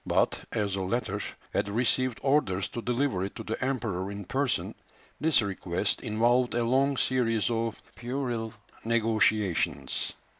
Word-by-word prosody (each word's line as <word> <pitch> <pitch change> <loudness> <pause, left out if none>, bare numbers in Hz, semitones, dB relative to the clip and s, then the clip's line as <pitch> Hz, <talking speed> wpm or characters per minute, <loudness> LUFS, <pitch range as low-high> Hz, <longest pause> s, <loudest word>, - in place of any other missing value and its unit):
But, - - +1
as 100 -2 -1
the 95 - -1
latter 105 +1 -1 0.3
had - - 0
received 125 +3 +1
orders 100 -10 +2
to 120 - -5
deliver 125 -5 0
it 100 - -5
to - - -6
the 110 +4 -3
Emperor 110 -8 -1
in 100 -1 -6
person, 135 +4 0 0.5
this 155 -7 +4
request 95 0 -1
involved 120 +3 +2
a 120 - +2
long 135 +3 +2
series 120 -4 +1
of 115 -1 -1
puerile 120 -3 -3 0.3
negotiations. 110 -5 +1
115 Hz, 140 wpm, -28 LUFS, 100-125 Hz, 0.5 s, this